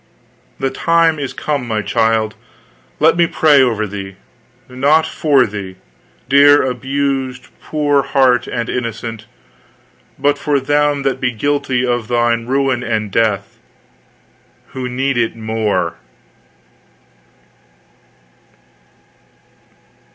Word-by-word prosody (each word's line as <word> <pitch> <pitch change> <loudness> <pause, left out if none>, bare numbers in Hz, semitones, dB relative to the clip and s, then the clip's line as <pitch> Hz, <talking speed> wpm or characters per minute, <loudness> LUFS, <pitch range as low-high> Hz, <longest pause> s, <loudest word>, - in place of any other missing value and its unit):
The 135 - -1
time 165 +2 +2
is 140 -2 -3
come, 145 -5 -3
my 110 -2 -2
child; 110 +1 +1 0.7
let 160 +2 +4
me 170 0 +3
pray 150 -4 +4
over 115 -4 +1
thee 95 -1 -7 0.5
not 140 +5 +2
for 140 -4 +2
thee, 100 -3 -7 0.5
dear 145 +2 +6
abused 130 0 -2
poor 145 -2 +1
heart 130 -3 +2
and 120 -2 -3
innocent, 115 -2 -5 0.9
but 145 0 +1
for 145 -1 +1
them 145 +1 +1
that 135 -1 -1
be 125 - +1
guilty 130 +1 -1
of 120 -3 -1
thy 120 -1 +2
ruin 130 +2 -1
and 110 -4 -2
death, 105 -3 -1 1.1
who 130 -1 -5
need 130 0 -1
it 115 -1 -1
more." 110 -6 -2
125 Hz, 105 wpm, -16 LUFS, 115-140 Hz, 1.1 s, dear